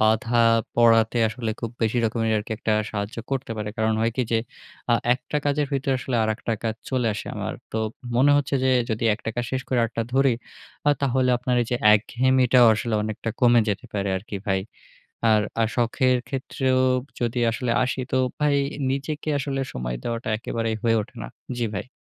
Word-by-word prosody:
বাঁধা 110 +2 +2 0.4
পড়াতে 115 0 +4
আসলে 115 0 -3
খুব 115 -2 -3
বেশি 115 +2 +1
রকমের 115 0 0
আরকি 105 +1 -5
একটা 110 - 0 0.2
সাহায্য 100 +1 -4
করতে 135 -3 -2
পারে। 105 0 -3
কারণ 110 0 +1
হয় 115 +1 +2
কি 130 - +2
যে, 115 - +4 0.5
আ - - +6 0.2
একটা 130 +3 -5
কাজের 145 0 +1
ভিতরে 135 0 0
আসলে 125 -1 -2
আরেকটা 110 +1 -2
কাজ 110 -1 0 0.2
চলে 125 -3 0
আসে 105 - -6
আমার, - - -3 0.2
তো 110 - -1 0.4
মনে 140 +3 +5
হচ্ছে 140 -1 0
যে 130 - +3 0.2
যদি 110 +1 -1
একটা 115 - -7
কাজ 120 0 -2
শেষ 130 0 -1
করে 125 - +1
আরেকটা 115 0 -1
ধরি 135 -1 +4 0.6
আ - - +7
তাহলে 130 -1 +2
আপনার 125 0 0
এইযে 120 +1 -1 0.2
একঘেয়েমিটাও 125 +2 +4
আসলে 115 0 -2
অনেকটা 110 +1 -3
কমে 120 -1 +6
যেতে 105 +5 -2
পারে 100 -1 -1
আরকি 100 +1 -6
ভাই। 95 0 +1 0.7
আর 105 -1 +4 0.2
আ - - +4
শখের 125 +1 +2
ক্ষেত্রেও 130 -1 0 0.4
যদি 120 0 -1
আসলে 120 +1 -2
আসি 130 +1 -2
তো 130 - +2 0.2
ভাই 150 -1 +3 0.4
নিজেকে 150 +3 -3
আসলে 135 -1 -2
সময় - - -3
দেওয়াটা 115 -1 -3
একেবারেই 115 0 -2
হয়ে 115 -1 +3
ওঠে 120 +4 -11
না। - - -6 0.3
জ্বি 120 - 0
ভাই। 100 - -4
120 Hz, 185 wpm, -24 LUFS, 110-130 Hz, 0.7 s, আ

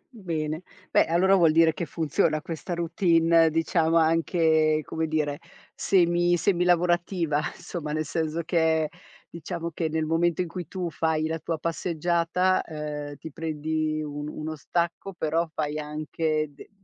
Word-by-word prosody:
bene. 165 - -4 0.3
Beh - - +4
allora 180 +4 +3
vuol 165 -4 +5
dire 165 0 +5
che 170 - -3
funziona 155 0 0
questa 165 +2 -5
routine, 165 -1 +3
diciamo 165 +1 +1
anche, 160 -1 +3
come 160 +3 -2
dire, 150 -2 -1 0.4
semi 175 -1 +3
semi 175 +1 +1
lavorativa, 175 -3 +2 0.2
insomma, 155 -4 -6
nel 155 +1 -1
senso 160 +1 -2
che 160 -2 +2 0.4
diciamo 170 0 -5
che 160 0 -1
nel 160 0 -1
momento 165 +2 +1
in 180 - -5
cui 175 -1 -6
tu 180 -2 -3
fai 155 +1 0
la 160 +1 -2
tua 165 +1 -3
passeggiata, 170 +3 0
ehm, 150 -2 -6
ti 160 +2 -10
prendi 155 0 -2
un 145 0 -5
uno 155 +1 -5
stacco, 170 +5 -2
però 165 0 0
fai 150 -1 -2
anche 155 +1 -2
de 140 - -14
160 Hz, 145 wpm, -26 LUFS, 155-170 Hz, 0.4 s, vuol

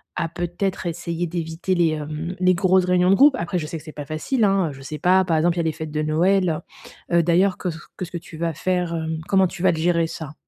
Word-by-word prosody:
à - - -1
peut-être 175 +3 -3
essayer 170 0 -3
d'éviter 170 +2 -2
les, 170 -2 +3
hem, 155 +3 -4
les 185 0 +5
grosses 185 0 +3
réunions 180 0 +3
de 195 - +6
groupe. 280 +4 +6
Après 175 +2 -2
je 155 - -4
sais 165 - -5
que 150 - -11
c'est 155 -2 -10
pas 145 - -7
facile 160 - -1
hein, 195 -4 +3
heu, - - -7
je 135 - -12
sais 150 +3 -6
pas 185 +4 +4
par 165 -3 +1
exemple 170 +2 +2
il - - +1
y - - +3
a - - -2
les 160 - +1
fêtes 160 -1 -6
de 150 0 -1
Noël. 170 +1 +2 0.5
Heu 170 - +4
heu, - - +3
d'ailleurs 180 +3 +3
que 180 - -3
s, 160 - -5 0.2
que - - -4
ce - - -14
que 175 - -4
tu 165 - -12
vas 165 0 -1
faire, 180 +1 -1
hem, 160 -1 -3
comment 190 -1 +4
tu 180 0 -9
vas 185 - +5
le 165 - -3
gérer 170 0 +2
ça? 155 -2 -7
170 Hz, 285 wpm, -22 LUFS, 160-185 Hz, 0.5 s, de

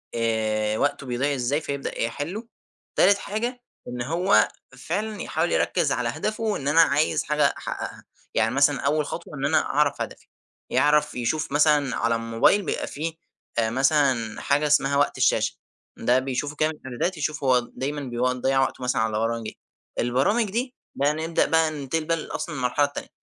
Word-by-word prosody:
آآ 110 -2 0
وقته 145 +1 0
بيضيع 130 +3 0
إزاي، 135 +4 0
فيبدأ 140 -2 -4
يحلُّه. 160 - -3 0.5
تالت 200 - +5
حاجة، 240 +5 -3 0.3
إن 125 0 -5
هو 170 +9 +3 0.3
فعلًا 210 +5 -3
يحاول - - -1
يركِّز - - +1
على - - 0
هدفه، 215 0 -2
إن 140 - -5
أنا 160 +3 +6
عايز 150 -1 +2
حاجة 150 0 +2
احققها. - - -6 0.3
يعني 110 +3 +1
مثلًا 140 0 +4
أوّل 150 +2 +1
خطوة، - - -7
إن - - -2
أنا - - +3
أعرف - - +1
هدفي. - - -6 0.4
يعرف 150 0 +3
يشوف 130 +6 -1
مثلًا 145 -2 +3
على 115 0 +1
الموبايل 115 - +3
بيبقى - - -2
في، 160 +2 -4 0.4
آآ، 115 -1 +2
مثلًا 130 -3 +1
حاجة 145 +2 +2
اسمها 140 -1 +3
وقت 145 - +1
الشاشة، - - +2 0.4
ده 125 +1 +3
بيشوفه 135 +3 -3
كده 155 +1 +2
من 160 - -6
الإعدادات، 140 +7 -3
يشوف 150 0 -2
هو، 130 -2 +4
دايمًا 140 +4 -4 0.3
بيضيع 135 +1 +1
وقته 130 -1 -2
مثلًا 125 -2 +1
على 110 -1 0
برامج 115 0 -1
إيه. - - -8 0.4
البرامج 135 - +2
دي، 250 +4 -2 0.2
بقى 145 +2 +2
نبدأ 160 +2 0
بقى 160 -1 +2
ننتقل 155 +2 -2
أصلًا 155 +1 -4
المرحلة 130 +2 +1
التانية، 145 - -7
145 Hz, 165 wpm, -25 LUFS, 125-155 Hz, 0.5 s, أنا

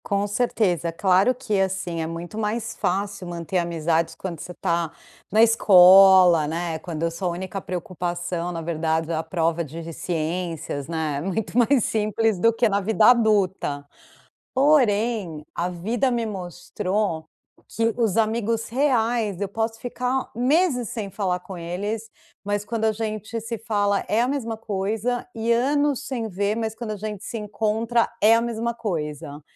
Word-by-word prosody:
Com 200 0 0
certeza, 205 -6 0
claro 190 +7 +3
que 230 -5 -1
assim, 185 -3 -1
é 160 - -2
muito 170 +4 -7
mais 220 +1 -2
fácil 200 0 -2
manter 175 +1 -2
amizades 165 -1 0
quando 175 -4 -6
você 180 - -7
está 170 -2 -1 0.4
na 220 +3 +6
escola, 190 -6 +7
né. 165 0 -3
Quando 165 -2 -5
a 165 - +1
sua 180 +3 -3
a - - 0
única 190 +3 -5
preocupação, 175 -1 -3
na 165 -1 -4
verdade, 160 0 -1
é - - 0
a 160 - 0
prova 165 0 0
de 165 +2 -8
ciências, 165 -4 -3
né. 155 -3 -2
Muito 195 +6 -3
mais 245 0 +4
simples 215 -1 0
do 230 +5 +4
que 230 +1 +2
na 200 -1 +1
vida 215 +2 +2
adulta. 195 -11 +1 0.7
Porém, 225 - +2
a 175 - -1
vida 225 +9 -1
me 235 -2 -1
mostrou 185 -2 -3 0.4
que 225 0 0
os 225 -5 +1
amigos 225 0 0
reais, 235 -6 +1
eu 200 - -1
posso 225 +2 -2
ficar 250 +2 -2
meses 255 - +2
sem 215 -4 -4
falar 185 -3 -1
com 180 +1 -9
eles, 200 +6 -4 0.3
mas 205 0 -2
quando 225 0 -2
a 220 - +3
gente 215 +1 -4
se 230 +1 -4
fala, 205 -2 0
é 220 +2 +2
a 245 - +2
mesma 240 -5 -2
coisa, 220 +3 -2
e 225 +1 0
anos 285 +3 +1
sem 240 -4 -3
ver 200 +2 -1
mas 220 -1 -2
quando 225 -1 -5
a - - -3
gente 210 0 -6
se 230 - -5
encontra 220 +2 0
é 215 +2 +7
a 230 - +2
mesma 235 0 -2
coisa. 150 -9 -4
205 Hz, 160 wpm, -23 LUFS, 175-225 Hz, 0.7 s, escola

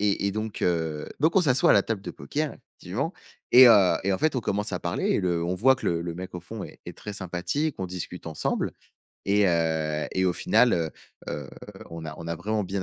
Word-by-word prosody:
et 100 -1 +1
et 100 - 0
donc, 110 0 -4
heu, 80 -3 -1
donc, 160 +4 +2
on 190 - +7
s'assoit 130 -6 +4
à - - +8
la 100 - +5
table 110 -4 -3
de - - -5
poker, 155 +1 -3
effectivement. - - -5 0.4
Et 130 +1 +10
heu 105 -6 +6
et 100 - +2
en - - 0
fait, 155 -2 +1
on 125 - +1
commence 105 0 -2
à - - -2
parler - - -2
et - - +1
le 85 -2 0
on 90 +2 -1
voit 130 +7 +4
que - - -6
le 85 -1 0
le 85 0 -4
mec 90 +1 -7
au 90 - -5
fond 105 +4 -8
est - - -10
est - - -9
très 105 - -7
sympathique, 95 - -2
on 95 - -2
discute 90 -1 -7
ensemble. 80 -2 -2 0.5
Et 100 0 +4
heu, 80 -3 0
et 95 - +1
au 90 - +3
final, 125 - +3
heu, 80 -2 0 0.4
heu, 70 -2 -5 0.4
on 85 -1 -7
a 80 - -6
on 85 - -8
a 85 - -1
vraiment 105 +3 -1
bien 95 0 -3
95 Hz, 245 wpm, -26 LUFS, 85-110 Hz, 0.5 s, Et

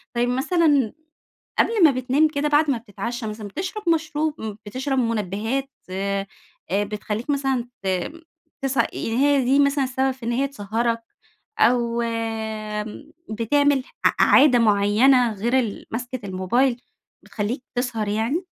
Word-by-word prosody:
طيب 240 +1 +1
مثلًا 285 - +2 0.7
قبل 445 -5 +3
ما 310 - +8
بتنام 260 +4 +2
كده 300 -1 -1
بعد 295 +1 +3
ما 260 - 0
بتتعشّى 230 +1 -5
مثلًا 210 0 -6
بتشرب 370 - -4
مشروب 310 -2 0
م 220 -2 -5
بتشرب 265 +5 -2
مُنَبِّهات 230 +3 -1 0.2
آآ 195 +1 -2 0.5
بتخلّيك 210 +4 -2
مثلًا 270 -4 0 0.2
ت - - -3 0.8
تس 270 0 -1
يعني 230 0 0
هي 285 -2 +3
دي 270 +3 +4
مثلًا 280 0 +3
السبب 265 +1 0
في 260 -1 -12
إن 235 - 0
هي 265 +4 +1
تسهَّرك، 230 -1 -1 0.6
أو 235 -1 +3
آمم 220 +2 -4 0.2
بتعمل 275 +5 +2 0.2
ع - - +7
عادة 265 -3 +6
معيّنة 225 +3 +4
غير 235 +6 +1
ال 225 -5 -3
ماسكة 245 +3 -4
الموبايل 220 +7 +1 0.5
بتخلّيك 230 +5 -4
تسهر 240 -4 -1
يعني؟ 225 - -1
245 Hz, 135 wpm, -23 LUFS, 220-275 Hz, 0.8 s, ما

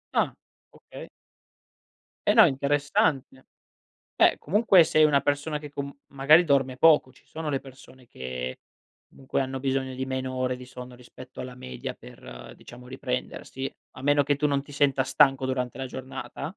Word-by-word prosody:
Ah, - - +2 0.4
okay. - - -12 1.2
Eh, - - +5
no, - - +9
interessante. 140 -1 0 0.7
Eh, - - +4
comunque 195 +1 +4
sei 155 - +3
una 145 -2 +4
persona 145 +2 -1
che 150 - -9
com 140 0 -6 0.2
magari 150 +6 +5
dorme 135 -3 +1
poco. 150 -3 +5
Ci 130 - -25
sono 160 -1 -6
le 135 -2 -1
persone 130 -2 -16
che 65 - -6 0.5
comunque 135 0 -3
hanno 130 0 -4
bisogno 135 -1 -2
di 130 +1 -4
meno 130 0 -3
ore 130 0 -1
di 125 0 -11
sonno 125 -1 -10
rispetto 125 +1 -12
alla 125 0 -8
media 65 - -7
per, 60 - -12
diciamo, 125 +1 -14
riprendersi, 130 +1 -5 0.3
a 130 - -9
meno 145 +1 +3
che 145 0 0
tu 150 - +1
non 140 -1 0
ti 145 - -15
senta 140 -2 +2
stanco 135 0 +3
durante 125 -1 -3
la 135 - -4
giornata? 130 +1 -8
135 Hz, 165 wpm, -26 LUFS, 130-145 Hz, 1.2 s, no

